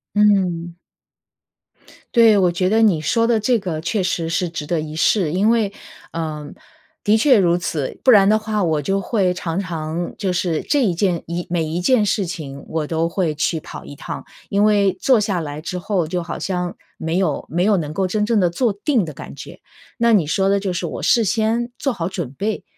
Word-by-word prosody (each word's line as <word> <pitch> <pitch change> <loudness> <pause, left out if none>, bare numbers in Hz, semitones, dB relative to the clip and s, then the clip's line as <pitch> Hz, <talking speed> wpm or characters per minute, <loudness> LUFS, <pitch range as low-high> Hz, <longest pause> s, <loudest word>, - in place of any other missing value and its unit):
嗯。 185 -5 +2 1.4
对， 225 -3 +6
我 185 -2 +4
觉 185 +2 0
得 220 +2 +3
你 195 -8 +3
说 230 +9 +1
的 230 -2 +2
这 240 +2 +2
个 175 -6 -4
确 180 +5 -1
实 170 -3 -1
是 170 +2 0
值 165 -2 -5
得 165 +2 -1
一 155 0 -6
试。 160 0 +2
因 200 +4 +2
为 225 -4 +1 0.4
呃， 155 -3 -4 0.5
的 215 +1 +4
确 255 +2 +5
如 175 -3 +3
此， 155 -5 -3
不 - - +5
然 200 -5 +7
的 215 +1 +4
话 215 -1 -1
我 160 -3 +1
就 195 +6 0
会 195 -4 +1
常 170 0 -3
常 165 -2 -4
就 195 -3 -1
是 175 -3 -1
这 290 - +1
一 180 -5 0
件 175 -2 0
一 170 +1 -3
每 170 -2 0
一 160 +3 -3
件 225 +2 +3
事 200 -1 0
情 150 -6 -7
我 155 -2 -2
都 165 +1 0
会 170 -4 -1
去 160 +2 0
跑 - - -10
一 145 - -11
趟。 - - -6 0.2
因 200 +1 +1
为 200 -3 +3
坐 255 -4 +4
下 200 -4 -1
来 145 -1 -5
之 170 +3 -5
后 180 -2 -1
就 175 +1 -2
好 170 - -6
像， 180 -2 -3 0.2
没 160 +2 -2
有 190 - 0
没 175 +3 0
有 210 0 +4
能 155 -5 -2
够 190 +2 0
真 210 +3 0
正 225 -1 +2
地 180 -3 +3
坐 225 +7 0
定 220 +3 0
的 160 - -5
感 140 - -10
觉。 - - -10 0.4
那 235 -1 +3
你 190 -7 +4
说 190 +6 +1
的 200 +1 +3
就 195 -1 -2
是 180 0 -3
我 - - -5
事 230 -2 +3
先， 225 +3 0
做 275 - -1
好 170 -8 -3
准 175 -8 -4
备， 210 +1 -2
185 Hz, 230 characters per minute, -20 LUFS, 165-210 Hz, 1.4 s, 然